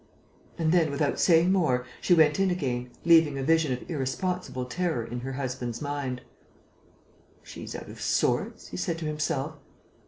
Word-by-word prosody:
And 160 -2 +1
then, 165 -3 +4
without 145 0 -1
saying 170 +1 +5
more, 150 -10 +2 0.2
she 175 - +4
went 155 -1 +4
in 195 -1 +3
again, 125 -8 -2 0.2
leaving 160 -4 +5
a 135 - -2
vision 160 -1 +3
of 125 - -4
irresponsible 160 -1 -2
terror 145 -3 -1
in 120 +1 -5
her 135 +2 -5
husband's 125 -3 -4
mind. 140 -4 -3 1.2
"She's - - -8
out - - -7
of - - -10
sorts," - - 0
he 90 - -6
said 165 - -1
to 165 - -5
himself. 150 -1 -2
150 Hz, 160 wpm, -27 LUFS, 130-165 Hz, 1.2 s, saying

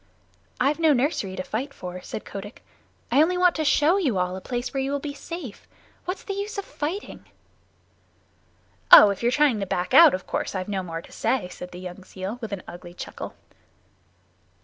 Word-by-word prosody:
"I've 280 +5 +2
no 320 -2 +5
nursery 245 - 0
to 185 - -4
fight 260 +9 -4
for," 180 0 -7
said 215 - -7
Kotick. 205 +2 -9 0.5
"I 285 - +5
only 360 +3 +2
want 360 -1 +4
to 315 - 0
show 305 +4 +4
you 275 - +1
all 180 0 0
a 190 - -7
place 245 +5 -4
where 270 - 0
you 270 +1 -2
will 285 - -1
be 285 0 -5
safe. 285 - -8 0.4
What's 365 +2 -4
the 400 - -4
use 405 +2 -4
of 400 - -3
fighting?" 335 +8 -5 1.7
"Oh, 205 - +11
if 200 - -5
you're 240 +1 +2
trying 275 -5 +3
to 195 - -3
back 180 0 -2
out, - - +9
of 185 - -7
course - - -3
I've 185 -1 -3
no 195 -2 -2
more 165 -2 -6
to - - -16
say," 245 -9 -1
said 180 - -9
the 180 - -9
young 185 +1 -8
seal 190 +5 -6
with 225 -3 -5
an 195 -3 -5
ugly 175 0 -10
chuckle. - - -7
240 Hz, 200 wpm, -25 LUFS, 185-295 Hz, 1.7 s, Oh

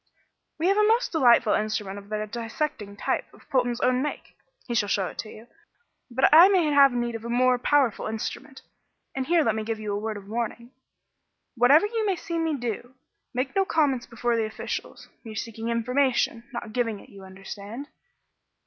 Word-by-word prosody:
"We 320 - -2
have 395 +2 +3
a 425 0 +4
most 460 +3 +2
delightful 240 -8 +4
instrument 210 -2 -2
of 200 0 -16
the 215 0 -2
dissecting 225 -1 -4
type, - - -2
of - - -21
Polton's 245 -3 +1
own 250 0 +2
make 295 - -5 0.3
he 240 - -4
shall 210 -3 +1
show 195 -2 +1
it - - -13
to 215 - -4
you. 220 +2 -12 0.6
But 260 +2 +3
I 335 +4 +10
may 370 -4 +3
have 280 -1 +6
need 240 -1 -2
of 225 -1 -6
a 235 - -6
more 250 +1 +3
powerful 265 -4 +2
instrument 260 +5 -6 0.5
and 265 -1 -3
here 335 -2 +4
let 225 - +2
me 220 0 -3
give 220 0 -3
you 210 -1 -3
a 200 - -1
word 215 0 -4
of 200 -1 -11
warning: 235 +2 -4 0.8
whatever 270 - +5
you 450 +1 -1
may 395 -3 +1
see 335 -1 -4
me 325 -2 0
do, 245 +1 -5 0.4
make 260 +2 -3
no 390 - +4
comments 290 -9 +1
before 240 0 -1
the 225 -1 +1
officials. 215 - -6 0.2
We 225 -3 -8
are - - -11
seeking 225 +1 -5
information, 240 0 +1
not 235 -3 -6
giving 230 -4 -1
it, - - -16
you 195 -1 -13
understand." 200 +7 -8
240 Hz, 195 wpm, -26 LUFS, 220-280 Hz, 0.8 s, I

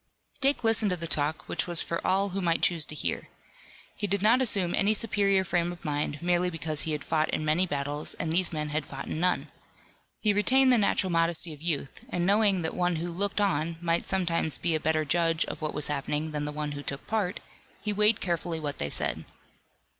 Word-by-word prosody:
Dick 275 -2 +2
listened 225 -2 +2
to 180 - -1
the 170 - -5
talk 155 -1 -1
which - - -2
was 175 -2 +1
for 170 - -3
all 195 +2 +2
who 195 +1 -3
might 170 -2 +1
choose 165 -4 +2
to 150 - -6
hear. 85 - -2 0.7
He 205 - -2
did 200 0 -1
not 235 +4 +5
assume 195 -8 +2
any 210 +2 +2
superior 200 -3 +2
frame 175 -1 0
of 175 +1 -11
mind, 145 0 -2
merely 175 +1 +2
because 155 -2 -4
he 160 - -1
had 150 - -3
fought 155 -1 0
in 155 - -2
many 165 +5 +2
battles 145 0 -3
and 160 - -3
these 180 +1 +2
men 150 -2 -3
had 150 0 -1
fought 135 -1 -7
in - - -4
none. 180 +1 0 0.7
He 210 -2 +2
retained 255 +5 +5
the 240 - +4
natural 200 -2 +1
modesty 165 -1 +1
of 150 - -14
youth, 155 -5 -3
and 175 0 -1
knowing 200 -2 +3
that 160 - -2
one 180 -1 0
who 170 +2 -3
looked 200 +4 -2
on 165 -4 0
might 170 0 0
sometimes 170 -5 +1
be 170 - 0
a 155 - +1
better 155 0 +1
judge 165 +2 +1
of - - -7
what 155 - -3
was 150 0 0
happening 150 +2 -2
than 150 -1 -3
the 150 - -3
one 150 0 -3
who 145 0 -5
took 140 -1 -5
part, 205 -4 -1 0.4
he 210 0 -2
weighed 210 +2 +3
carefully 170 -2 -2
what 145 -2 -4
they 70 - 0
said. - - +1
170 Hz, 220 wpm, -28 LUFS, 155-195 Hz, 0.7 s, not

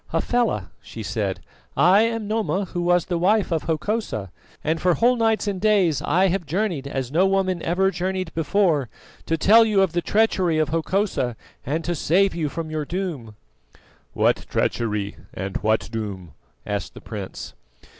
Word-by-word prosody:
"Hafela," 235 - 0
she 110 - -8
said, 100 -2 -2 0.4
"I 190 +5 +6
am 225 -2 -1
Noma 210 -2 0
who 175 - -1
was 175 0 +2
the 175 -2 -2
wife 200 +2 +2
of 160 -2 -1
Hokosa, 160 - -2 0.3
and 160 +1 0
for 180 -2 +3
whole 245 +2 +3
nights 225 -2 +1
and 195 -3 -2
days 195 -9 +3
I 185 +5 +2
have 175 -3 -2
journeyed 175 -5 -1
as 135 -2 -3
no 180 +6 +3
woman 190 -2 +1
ever 190 +3 +1
journeyed 185 0 -3
before, 165 - +1 0.4
to 165 - +1
tell 220 +8 +6
you 210 -3 +3
of 190 - 0
the 175 - +1
treachery 185 -3 +2
of 155 -2 +1
Hokosa 165 - 0 0.3
and 155 +5 -2
to 175 - -1
save 185 +5 +2
you 160 -3 -2
from 160 +2 -5
your 155 -1 -2
doom." 150 - -4 0.8
"What - - +1
treachery 105 -3 -1 0.2
and 95 +1 -3
what 110 +1 0
doom?" 100 -7 -5 0.3
asked 100 -3 -4
the - - -10
prince. - - -7
175 Hz, 165 wpm, -23 LUFS, 140-195 Hz, 0.8 s, I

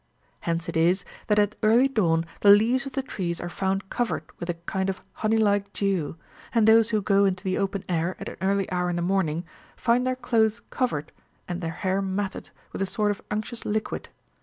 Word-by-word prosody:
Hence 165 0 -2
it - - -4
is, 175 +4 +3 0.2
that 210 - +3
at 210 0 +3
early 230 +4 +5
dawn 170 -10 +1
the 205 - +5
leaves 235 +7 +5
of 270 - -8
the 270 - -1
trees 175 -9 -3
are 175 - -4
found 195 +1 -2
covered 240 -2 -1 0.2
with 175 - -5
a 175 - 0
kind 190 +3 -2
of 190 - -3 0.2
honey 220 +1 +2
like 205 -2 +2
dew, 185 -6 -1 0.4
and 225 -2 +4
those 225 0 +6
who 215 -3 0
go 200 0 +4
into 185 -1 0
the 185 0 0
open 195 -1 -1
air 175 +1 0
at - - -6
an - - -7
early 195 0 +1
hour 180 -1 0
in 175 - -1
the 175 - -1
morning, 175 -3 0 0.3
find 245 +2 +2
their 255 - +1
clothes 230 -3 +1
covered, 155 - -1 0.4
and 175 0 -4
their 165 - -2
hair 185 +4 -1
matted, 195 0 -3 0.2
with - - -4
a 195 - +1
sort 210 +1 +1
of 205 - -5
unctuous 215 +3 -4
liquid. 215 +1 -2
195 Hz, 210 wpm, -26 LUFS, 180-220 Hz, 0.4 s, those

